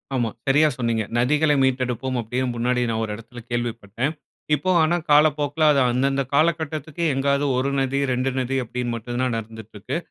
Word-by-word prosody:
ஆமா. 120 -3 0 0.2
சரியா 150 +3 +5
சொன்னீங்க. 115 -3 0
நதிகளை 150 +5 +3
மீட்டெடுப்போம். 130 0 -1
அப்பிடியே 125 +4 -2
முன்னாடி 125 +1 0
நான் 110 0 -1
ஒரு 110 - -3
இடத்துல 115 +2 -11
கேள்விப்பட்டேன். 120 +2 -2 0.4
இப்போ 170 +6 -3
ஆனா 165 +2 +2
காலப்போக்கில 150 0 +3
அது 140 - +3
அந்தந்த 135 +2 +1
காலகட்டத்துக்கு 155 +1 0
எங்காவது 140 +1 +1
1 130 +2 0
நதி, 135 +1 0
2 130 +1 0
நதி 130 +1 -2
அப்பிடின்னு 120 0 -3
மட்டும் 120 +2 -4
தான் 125 -2 0
நடந்துட்டு 110 -1 -9
இருக்கு. 105 +10 -3
130 Hz, 160 wpm, -23 LUFS, 120-145 Hz, 0.4 s, சரியா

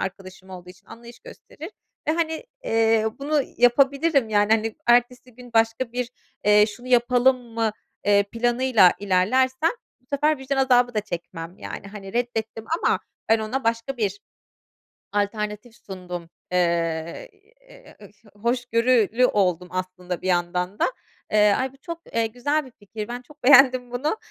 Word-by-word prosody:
arkadaşım 190 0 -7
olduğu 180 -1 -10
için 185 +3 -19
anlayış 235 +1 -13
gösterir. 420 -8 -11 0.4
E, 310 - +2
hani, 320 +3 -2 0.2
eee, 225 - +2
bunu 290 +1 0
yapabilirim, 275 +2 +3
yani, 205 0 +2
hani, 225 0 0
ertesi 245 0 +2
gün 245 -1 -14
başka 225 +2 +1
bir, 245 0 -3 0.3
eee, 210 0 +6
şunu 240 +4 -10
yapalım 250 +1 +4 0.2
mı, 225 -2 0 0.3
eee, 200 0 +4
planıyla 235 -2 +3
ilerlersem 255 - +2 0.3
bu 250 - -36
sefer 300 +1 +2
vicdan 265 +1 -3
azabı 250 -2 +3
da 215 - +1
çekmem 175 -2 -7
yani, - - -8
hani, 195 -1 -10
reddettim 225 -2 -3 0.2
ama - - +3 0.3
ben 225 +1 +4
ona 220 +5 -3
başka 230 +3 -1
bir 205 -3 -2 0.9
alternatif 210 +2 -3
sundum. 180 -4 -8 0.2
Eee, 170 - -1
iii, 410 +3 -30 0.2
eee, - - -16
ı - - -13 0.3
hoşgörülü 240 0 +2
oldum 180 -6 +1
aslında 185 -1 -5
bir - - -4
yandan 180 +2 -1
da. - - +3 0.5
Eee, 210 -1 +5
ay, 260 0 -2
bu - - -19
çok, 335 +4 -8
eee, 230 -1 +1
güzel 285 +7 -1
bir 260 - -14
fikir. 210 +1 -7
Ben 245 +1 -6
çok 290 +3 -20
beğendim 255 -2 +6
bunu. 290 - -1
230 Hz, 150 wpm, -23 LUFS, 200-255 Hz, 0.9 s, eee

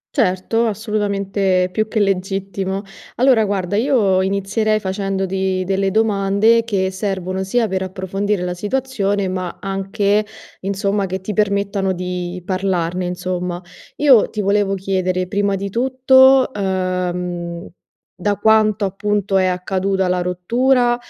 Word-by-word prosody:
Certo, 225 0 +1
assolutamente 200 -3 0
più 215 +1 0
che 220 0 -1
legittimo. 195 0 -1 0.3
Allora 245 -3 +4
guarda 200 -1 -1
io 220 -7 +2
inizierei 200 +3 0
facendoti 190 -1 -2
delle 195 +1 0
domande 215 +2 +2
che 190 -4 0
servono 190 -1 -3
sia 225 +4 +1
per 190 -2 -2
approfondire 190 +1 -2
la 180 0 -2
situazione, 205 -2 -1
ma 185 -1 -4
anche 200 +1 0 0.4
insomma 200 +1 -1
che 190 +1 -3
ti 200 +3 -5
permettano 200 -2 0
di 180 0 -4
parlarne, 185 -2 -1
insomma. 180 0 -3 0.4
Io 270 -7 +5
ti 215 - -3
volevo 200 0 +1
chiedere 185 -1 -1
prima 200 +1 0
di 195 0 -4
tutto, 260 +2 +4
uhm, 180 -3 -2 0.5
da 205 +3 -1
quanto 215 -1 +3
appunto 200 0 -1
è 185 - +3
accaduta 190 +1 -1
la 180 0 +1
rottura, 240 +8 +2
195 Hz, 120 wpm, -19 LUFS, 185-210 Hz, 0.5 s, Io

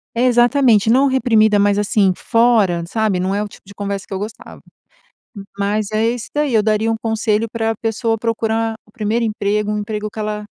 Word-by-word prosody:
É, 235 - 0
exatamente, 240 -3 +3
não 265 +4 +4
reprimida, 225 -6 +3
mas 205 0 +2
assim, 205 -2 +2
fora, 230 -7 +2
sabe, 215 -2 0
não 190 +2 -1
é 205 - 0
o 210 - -5
tipo - - -17
de 200 - -13
conversa 200 -1 -4
que - - -5
eu - - -2
gostava. 215 +3 -8 1.0
Mas 205 +1 -1
é 215 +1 0
esse 235 0 -2
daí, 295 -3 0
eu 220 -2 +3
daria 215 +1 +1
um - - 0
conselho 220 0 0
pra 225 -1 -1
pessoa 225 +1 -1
procurar 225 0 -1
o 210 - -24
1º 220 +2 -1
emprego, 210 -1 -1
um 210 - -1
emprego 210 0 -4
que 220 - -10
ela 210 0 -3
215 Hz, 200 wpm, -18 LUFS, 205-230 Hz, 1.0 s, não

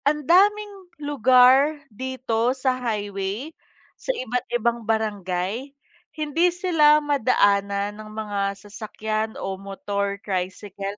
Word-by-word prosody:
Andaming 380 +6 +2
lugar 270 +1 +4 0.2
dito 255 0 -1
sa 260 0 +1
highway, 205 +4 -3 0.5
sa - - -11
iba't 250 - -1
ibang 235 0 0
barangay, 215 +3 -2 0.4
hindi 310 +3 +2
sila 330 -4 +4
madaanan 205 -8 +1
ng 215 - -11
mga 215 -1 -4 0.2
sasakyan 215 +1 -4
o 195 0 -5
motor 200 0 -3
tricycle 195 +1 -4
230 Hz, 100 wpm, -23 LUFS, 205-290 Hz, 0.5 s, lugar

